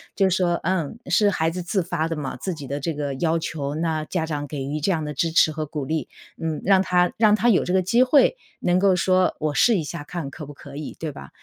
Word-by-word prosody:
就 195 - +3
是 185 - +1
说， 175 -2 +1
嗯， 185 0 -1
是 205 +3 +3
孩 165 -4 0
子 180 +2 -4
自 180 +2 -1
发 165 -2 -1
的 165 - -3
嘛， 145 -3 -4
自 185 -3 -4
己 145 -3 -8
的 140 +2 -4
这 160 +2 -3
个 145 -1 -3
要 160 +4 0
求， 150 -3 -4
那 160 -1 -1
家 165 0 -2
长 145 -2 -4
给 140 -2 -5
予 150 +2 -3
这 190 - +1
样 160 -4 -1
的 150 - -4
支 165 +4 0
持 160 -1 +4
和 155 0 -4
鼓 150 -2 -4
励。 155 +3 -2 0.3
嗯， 160 -2 -2
让 195 -1 +5
他 180 -1 +2
让 215 -1 +5
他 225 +3 +1
有 220 -6 +4
这 180 - -2
个 190 0 +3
机 230 +7 +3
会 275 - +4 0.2
能 180 0 +2
够 195 -1 +4
说 185 +1 +2
我 155 -1 -1
试 230 +7 +4
一 165 - -1
下 155 +1 -6
看 145 -2 -6
可 150 - -9
不 145 - -9
可 140 0 -12
以， 150 0 -7
对 160 -2 -3
吧？ 70 - -11
165 Hz, 290 characters per minute, -23 LUFS, 150-185 Hz, 0.3 s, 让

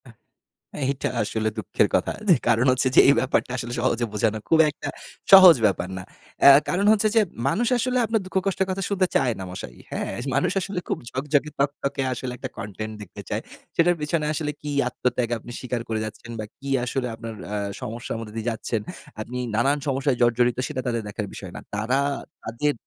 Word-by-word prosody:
আ - - -12 0.8
এইটা 135 0 -1
আসলে 110 +1 -1
দুঃখের 105 -5 +1
কথা। - - +1 0.2
যে - - +9
কারণ 115 +3 +3
হচ্ছে 130 +1 +2
যে - - +9
এই - - +7
ব্যাপারটা 130 0 0
আসলে 120 -1 -4
সহজে 120 -1 +1
বোঝানো 110 +1 +1
খুব 160 - +5
একটা 145 - -8 0.4
সহজ 185 -3 +11
ব্যাপার 95 -3 +1
না। 95 - -6 0.4
এ - - +11 0.2
কারণ 190 +3 +1
হচ্ছে 215 0 +3
যে 225 - +7 0.3
মানুষ 230 +12 +1
আসলে 255 +1 0
আপনার 225 0 +1
দুঃখ 185 - -12
কষ্টের 190 -1 0
কথা 195 +1 -2
শুনতে 190 -2 +2
চায় 125 - +3
না - - -4
মশাই, 60 -9 -8
হ্যা? - - -3 0.3
মানুষ 180 - +2
আসলে 195 -1 -3
খুব - - -1
ঝকঝকে 145 +2 0
তকতকে 140 0 -1
আসলে 125 +1 -5
একটা - - -6
content 110 +1 -5
দেখতে 100 - -9
চায়। - - -1 0.3
সেটার 175 +1 +4
পেছনে 150 +1 -1
আসলে 150 -1 -2
কি 150 - -5 0.2
আত্মত্যাগ 125 -1 -1
আপনি 120 - -11
স্বীকার 125 -2 -3
করে 110 -1 -1
যাচ্ছেন 110 +2 -9
বা 110 - -3
কি 140 0 -7 0.2
আসলে 125 +1 -2
আপনার 115 0 -7 0.2
আ - - -1 0.3
সমস্যার 115 +2 -5
মধ্যে 110 -2 -8
দিয়ে 115 +1 -4
যাচ্ছেন, 115 0 -3 0.4
আপনি 125 +3 -6 0.2
নানান 135 +6 +3
সমস্যায় 135 -1 +1
জর্জরিত 120 0 +3
সেটা 130 - -3
তাদের 115 -1 0
দেখার 105 0 -4
বিষয় 95 -3 -8
না। - - -7
তারা 110 +6 0 0.5
তাদের 130 +6 -1
125 Hz, 190 wpm, -24 LUFS, 115-150 Hz, 0.8 s, সহজ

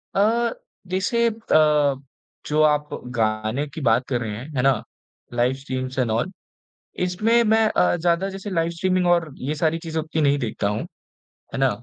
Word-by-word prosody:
अ, 230 +4 +2 0.3
जैसे 195 +6 +1
अ, 155 -10 +3 0.5
जो 150 +1 +1
आप 150 0 0 0.3
गाने 110 +5 0
की 150 +2 -8
बात 120 0 +3
कर 125 -3 -1
रहे 110 -3 -3
हैं, 130 - -8
है 125 - +2
ना? 130 -4 +2 0.5
लाइव 120 +2 +2
स्ट्रीम्स 130 -1 -4
एंड 120 -3 +1
ऑल 120 +12 0 0.7
इसमें 220 +6 +2
मैं 220 0 +4
अ, 180 - +2
ज़्यादा 175 +2 +1
जैसे 195 +1 -6
लाइव 165 -3 0
स्ट्रीमिंग 185 +1 +1
और 170 -3 +2
ये 140 +4 -3
सारी 160 +1 +1
चीज़ें 160 0 -2
उतनी 155 0 -2
नहीं 145 -1 +3
देखता 110 -4 -2
हूँ। 105 - -2 0.7
है - - -2
ना? 135 0 +4
155 Hz, 175 wpm, -23 LUFS, 130-185 Hz, 0.7 s, मैं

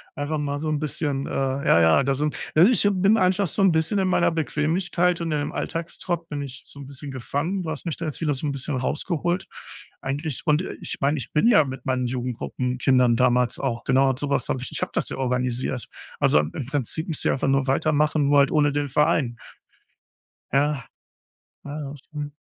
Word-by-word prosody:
Einfach 150 +1 -2
mal 145 0 -2
so 155 0 -2
'n 150 - 0
bisschen, 145 -2 -2
äh, - - -6
ja, 135 -8 +2
ja 80 +12 +5
da 135 +1 +1
sind 150 +2 -1 0.2
also, 180 +10 +7
ich 205 -3 +3
bin 200 +4 +3
einfach 190 +1 +2
so 195 - -2
'n 195 -2 +5
bisschen 160 +5 +1
in 190 - +1
meiner 175 -2 +3
Bequemlichkeit 170 +3 0
und 165 -1 -2
in 150 - +1
dem 145 - -3
Alltagstrott 170 0 -4
bin 145 -2 -4
ich 130 -2 -8
so 140 - -12
'n 140 - -9
bisschen 140 0 -8
gefangen. 145 +9 -2
Du 160 - -4
hast 160 - -5
mich 165 - -3
da 165 - -4
jetzt 150 - -4
wieder 150 -3 +1
so 140 +3 -3
'n - - 0
bisschen 140 +1 -3
rausgeholt 175 +6 -1 0.6
eigentlich, 145 +2 -3
und, 155 +2 +3
äh, - - -6
ich - - -5
meine, 145 +2 +2
ich 120 - -7
bin 150 +9 +3
ja 205 -10 +6
mit 130 -2 -7
meinen 130 -1 0
Jugendgruppen-Kindern 125 0 0
damals 125 0 +2
auch 120 -4 -2
genau 135 +1 +3
und 130 - -1
so 145 - -3
was 135 -3 0
habe - - 0
ich - - -6
ich - - -4
habe - - -2
das - - +1
ja - - -5
organisiert. 125 -1 -1 0.3
Also, 75 - +4
im 75 +1 -2
im 135 - -4
Prinzip 145 +3 -2
müsst 160 -4 -2
ich - - +4
einfach 135 - -1
nur 135 0 +2
weitermachen, 150 +1 +2
nur 145 0 +5
halt 140 - +4
ohne 145 -2 +3
den 145 0 -1
Verein. 140 -4 +1 1.2
Ja. 145 0 +1 0.8
Ja. 145 -1 -6
Das 145 - -9
stimmt. 145 +1 -7
145 Hz, 220 wpm, -24 LUFS, 130-160 Hz, 1.2 s, also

